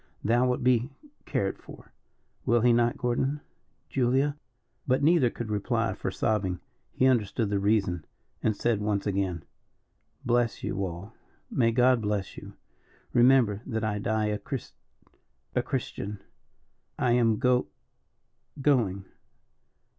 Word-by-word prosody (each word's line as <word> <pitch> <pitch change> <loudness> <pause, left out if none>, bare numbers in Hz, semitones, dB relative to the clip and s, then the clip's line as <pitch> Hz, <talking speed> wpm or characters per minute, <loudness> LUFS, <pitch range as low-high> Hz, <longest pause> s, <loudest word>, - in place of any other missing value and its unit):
Thou 120 +4 +3
wilt 125 0 -1
be 125 0 +3 0.4
cared 95 -1 -1
for; - - -14 0.5
will 120 0 +3
he 120 +1 +5
not, 120 0 +2
Gordon 130 +4 0 0.5
Julia?" 135 +3 +1 0.5
But 130 +1 +2
neither 155 -5 +4
could 115 -2 -6
reply 105 -1 0
for - - -4
sobbing. 95 -5 -1 0.3
He 130 - +1
understood 115 -4 +1
the 100 - +1
reason, 95 -5 +1 0.4
and 110 - +1
said 115 -3 +1
once 105 -1 -1
again: 95 -4 -1 0.8
"Bless 120 -3 +1
you 100 - -2
all 95 +4 -6 0.4
may 115 -3 +3
God 125 0 +4
bless 105 -2 -2
you. - - -10 0.6
Remember 120 -4 +4
that 110 -4 -2
I 105 -1 -1
die 110 +1 0
a 105 0 -1
Chris 130 -6 -6 0.8
a - - +2
Christian. 100 +1 -4 0.8
I 125 - +1
am 115 -3 +3
go 125 +1 +2 0.9
going. 115 -9 +1
115 Hz, 130 wpm, -28 LUFS, 105-125 Hz, 0.9 s, he